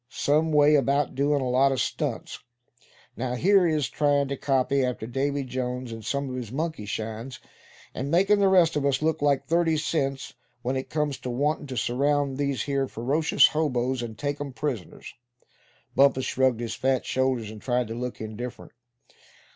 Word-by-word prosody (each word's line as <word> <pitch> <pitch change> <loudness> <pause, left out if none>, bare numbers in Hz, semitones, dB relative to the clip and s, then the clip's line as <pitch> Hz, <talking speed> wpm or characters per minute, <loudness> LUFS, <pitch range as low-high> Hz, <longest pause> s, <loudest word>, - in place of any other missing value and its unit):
Same 155 +3 +1
way 150 0 +5
about 140 0 +2
doin' 140 +1 +1
a 130 - -1
lot 135 +2 +4
of 130 - -1
stunts. - - -3 0.8
Now 125 0 -3
here 190 +6 +4
he 160 - +1
is, 150 -5 0
tryin' 145 +2 +1
to 140 - -2
copy 135 0 +1
after 125 -3 -2
Davy 140 +4 -1
Jones 125 -1 -4
in 115 0 -7
some 140 +5 -2
of 130 - -5
his 120 -4 -6
monkey 155 -6 -3
shines; 110 +3 -5 0.5
and 135 +2 -4
makin' 195 +5 +3
the 200 - +4
rest 180 -4 +4
of 145 - 0
us 140 +1 +1
look 160 -2 0
like 140 -2 +2
thirty 165 -1 +2
cents 140 -3 -2 0.3
when 130 +2 -1
it 130 - -4
comes 150 -3 -1
to 125 - -5
wantin' 145 +4 -1
to 130 -2 -6
surround 140 +2 0
these 140 -2 0
here 140 -1 -1
ferocious 140 +8 +3
hoboes, 130 -5 0
and 115 -2 -6
take 145 0 -3
'em 140 -2 -5
prisoners." 125 - -5 0.8
Bumpus 135 -1 +4
shrugged 130 -3 +1
his 115 - -3
fat 130 -1 0
shoulders, 130 -5 0
and 110 -1 -11
tried 125 -2 0
to - - -4
look 125 +1 -5
indifferent. 110 +3 -7
135 Hz, 180 wpm, -26 LUFS, 125-145 Hz, 0.8 s, way